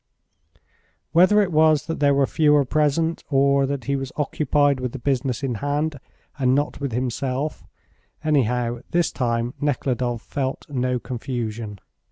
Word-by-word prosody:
Whether 185 +5 +5
it 190 - -3
was 155 -1 +4
that 165 - -4
there 140 -1 +4
were 140 0 +3
fewer 150 -1 +3
present, 155 +4 +1
or 140 -1 +3
that 140 -2 -3
he 140 +3 -1
was 135 -1 -4
occupied 145 -1 +1
with 125 -2 -3
the - - -4
business 130 0 -1
in 130 -2 -1
hand 145 +1 -1 0.4
and 130 -1 +3
not 145 +1 -1
with 140 -2 -3
himself, 130 +4 -2 0.6
anyhow, 125 -5 +1
this 175 -1 +1
time 120 -1 -1
Nekhludoff 125 -4 -1
felt 135 -2 -3
no 125 -2 0
confusion. 115 -3 -5
135 Hz, 145 wpm, -23 LUFS, 125-150 Hz, 0.6 s, Whether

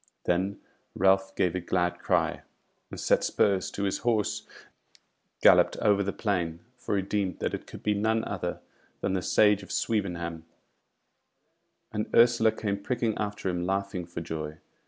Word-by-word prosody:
Then 95 +3 0 0.4
Ralph 95 0 +3
gave 90 - +1
a 90 - -2
glad 90 0 0
cry, - - +1 0.5
and - - -8
set - - +2
spurs 95 -2 +2
to 100 - -4
his 95 - 0
horse 110 -3 0
and - - -22 0.5
galloped - - +6
over 100 -1 +3
the 100 0 -1
plain; 85 -7 -2
for 125 -4 -2
he 95 - 0
deemed 95 -2 -1
that - - -2
it - - -5
could - - -11
be 105 - +2
none 110 +2 +1
other - - -4 0.4
than 95 - 0
the 95 - 0
Sage 105 +2 +4
of 95 - -11
Swevenham; 85 -6 -2 1.5
and 105 0 -3
Ursula 115 -1 +5
came 100 -2 -3
pricking 115 -1 -1
after 105 -2 -3
him 90 -1 -1
laughing 95 -2 -2
for 85 -1 -6
joy. 80 -2 -5
100 Hz, 160 wpm, -28 LUFS, 90-105 Hz, 1.5 s, galloped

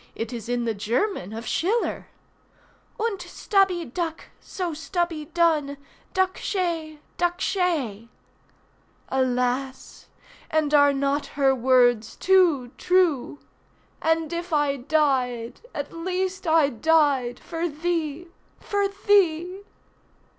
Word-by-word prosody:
it 230 +2 -4
is 230 -1 -6
in 245 -1 0
the 225 - 0
German 220 - -1
of 225 +2 -6
Schiller— 430 +8 -1 0.9
"Unt 435 -3 -1
stubby 385 -5 +1
duk, 325 +5 -4
so 360 -4 -4
stubby 325 0 -2
dun 315 -4 +1 0.4
Duk 375 0 +1
she! 330 -5 -2 0.2
duk 350 0 0
she!" 295 - -1 1.0
Alas! 260 0 -1 0.4
and 310 -1 +1
are 285 -1 +6
not 280 +1 0
her 270 -1 +4
words 245 -3 +3
too 345 -10 +3
true? 345 -7 +1 0.6
"And 325 0 +1
if 345 +1 -4
I 295 -2 +2
died, 255 -4 0
at 285 0 -5
least 370 +2 -3
I 315 -3 +4
died 275 -2 +2
For 335 +1 -3
thee—for 340 +5 -3 0.2
thee." 365 -2 +3
310 Hz, 105 wpm, -24 LUFS, 260-350 Hz, 1.0 s, are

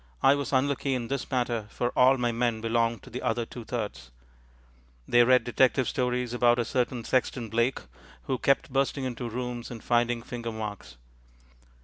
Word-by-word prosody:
I 135 - +7
was 140 -1 -2
unlucky 135 0 +1
in 120 -2 -4
this 140 -1 -3
matter, 120 -4 -1
for 120 - -1
all 130 +2 +4
my 120 -1 0
men 115 -1 0
belonged 115 0 0
to - - -13
the 125 - -5
other 120 -2 0
two 120 +1 -9
thirds; 105 - -5 1.0
they 120 0 +6
read 125 +1 +5
detective 130 +1 +2
stories 125 -1 -1
about 120 0 +4
a 120 - 0
certain 125 0 -1
Sexton 125 -2 -1
Blake, 115 +4 +1 0.4
who 130 -2 -2
kept 135 -1 +1
bursting 135 0 0
into 120 -1 -4
rooms 125 0 -5
and 115 -3 -9
finding 120 -1 +1
finger 120 -1 -5
marks. 105 - -7
120 Hz, 170 wpm, -27 LUFS, 115-130 Hz, 1.0 s, I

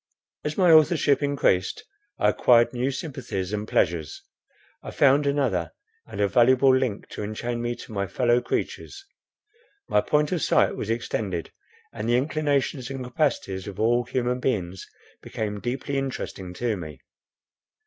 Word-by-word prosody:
As 150 0 -3
my 180 -3 +5
authorship 155 -3 +4
increased, 140 -11 +1 0.3
I - - +3
acquired 120 -1 +4
new 125 +2 0
sympathies 130 - -5
and 105 0 -3
pleasures. 80 -8 0 0.6
I - - -8
found 140 +1 +3
another 130 - 0 0.3
and - - -8
a 100 - +3
valuable 130 +5 +5
link 125 -6 -1
to - - -7
enchain 120 +3 -4
me 120 0 -2
to - - -11
my 100 -2 -2
fellow 120 +2 +2
creatures; 390 - -4 0.8
my - - +3
point 150 0 +1
of 175 -4 -1
sight - - +3
was - - -5
extended, 105 -6 -3 0.4
and 115 0 -4
the 120 - +4
inclinations 140 -2 -1
and 135 -2 -5
capacities 125 - -1
of 100 - -8
all 120 +2 +2
human 125 +1 -1
beings 95 -8 -2 0.3
became 105 -1 -4
deeply 130 +4 -2
interesting 95 -9 -5
to 120 0 -1
me. 75 -7 -8
120 Hz, 150 wpm, -25 LUFS, 105-135 Hz, 0.8 s, my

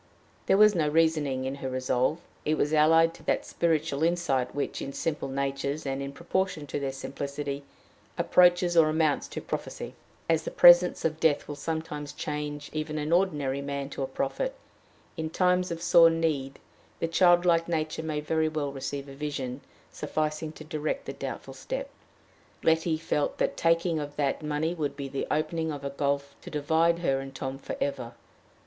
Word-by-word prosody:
There 195 - +5
was 210 0 +7
no 160 -5 +1
reasoning 150 -4 +2
in 135 - -2
her 130 - -2
resolve: 130 +3 0 0.3
it 155 - +1
was 150 +2 +1
allied 165 +2 +5
to - - -15
that - - 0
spiritual 155 -4 0
insight 165 -7 +1
which, 145 - -2
in 140 - -5
simple 150 -1 -2
natures, 140 +2 -2
and 135 0 -2
in 140 0 -4
proportion 170 +1 -2
to 145 - -3
their 135 -1 -2
simplicity, 140 +1 -5 0.6
approaches 175 -1 +4
or 160 -2 +6
amounts 155 -2 +1
to - - -6
prophecy. - - -5 0.3
As 165 -1 +2
the - - -4
presence 175 0 +7
of 160 -1 0
death 155 -3 +2
will 145 - -4
sometimes 150 -1 -4
change 150 -1 -4
even 155 0 -3
an 150 +1 -2
ordinary 145 -7 +1
man 140 0 -4
to - - -5
a 135 - -1
prophet, 135 - -2 0.6
in 160 -1 -2
times 180 +1 +2
of 165 0 -5
sore 165 -1 +7
need 155 -5 -1 0.4
the - - 0
childlike 175 -1 +4
nature 160 -2 -1
may 155 -2 -2
well 155 -2 0
receive 140 +1 -5
a 135 - -9
vision 135 -2 -4 0.3
sufficing 155 0 -2
to 155 - -10
direct 155 0 -3
the - - -5
doubtful - - -6
step. - - -5 0.7
Letty 160 0 +2
felt 150 -2 -1
that - - +1
the - - -8
taking 165 0 +2
of 145 -1 -6
that 145 -1 0
money 150 +2 -1
would 145 -4 -3
be 140 -1 -5
the 135 - -3
opening 160 +1 -1
of 145 -2 -6
a 140 - -2
gulf 140 0 -1
to - - -9
divide 160 +2 +2
her 135 0 +2
and 135 0 -8
Tom 135 0 -4
for - - -5
ever. 125 -4 -3
150 Hz, 180 wpm, -28 LUFS, 140-165 Hz, 0.7 s, was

